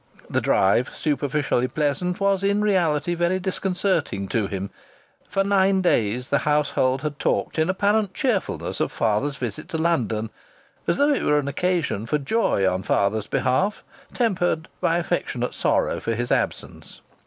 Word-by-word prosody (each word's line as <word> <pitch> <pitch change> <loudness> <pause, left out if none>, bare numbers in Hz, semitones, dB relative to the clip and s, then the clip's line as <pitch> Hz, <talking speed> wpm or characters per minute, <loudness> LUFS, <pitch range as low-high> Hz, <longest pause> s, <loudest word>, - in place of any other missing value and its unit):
The - - 0
drive, 100 +6 +3
superficially 145 -4 0
pleasant, 150 +6 -1
was 195 -1 +2
in 200 +1 +2
reality 175 -5 +1
very 175 +2 +1
disconcerting 185 - -1
to 110 -3 0
him. 100 -1 -5 0.6
For 195 - +1
nine 195 -1 +3
days 125 - +1
the 140 - +3
household 145 -3 +1
had 150 -1 -4
talked - - 0
in 160 +2 +2
apparent 200 +1 +1
cheerfulness 250 -10 -1
of - - 0
father's 135 +7 0
visit 130 +5 -5
to 160 - -2
London, 115 -10 0 0.6
as 170 - +2
though 290 +1 +4
it - - -1
were 150 - +2
an 145 -1 -1
occasion 150 - -1
for 150 - +1
joy 145 - +1
on 95 0 0
father's 105 +2 0
behalf, 185 +11 0 0.3
tempered 175 -8 0
by 165 - +2
affectionate 160 -8 -2
sorrow - - +1
for 115 - -2
his 120 +2 -3
absence. - - -3
155 Hz, 155 wpm, -23 LUFS, 125-185 Hz, 0.6 s, though